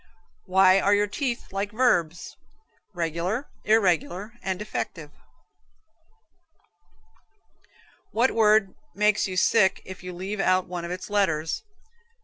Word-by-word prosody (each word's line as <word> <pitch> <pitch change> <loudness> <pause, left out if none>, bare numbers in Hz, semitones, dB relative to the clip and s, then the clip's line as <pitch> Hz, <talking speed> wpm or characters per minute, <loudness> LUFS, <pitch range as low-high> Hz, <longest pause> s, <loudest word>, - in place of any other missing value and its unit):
Why 190 0 +5
are 200 +1 +3
your 205 0 +2
teeth 235 +1 -4
like 200 +1 -2
verbs? 175 -9 0 0.6
Regular, 175 - -2 0.2
irregular 195 -1 +1
and 190 -1 -2
defective? 170 -6 -5 3.0
What 240 +4 +2
word 215 -3 +3 0.2
makes 210 0 +2
you 185 -1 -5
sick 190 0 +3
if 185 0 -9
you 180 0 -7
leave 190 +4 -5
out 185 -1 +2
one 175 -1 -5
of - - -6
its 180 +3 -6
letters? 165 -6 0
190 Hz, 115 wpm, -25 LUFS, 180-210 Hz, 3.0 s, Why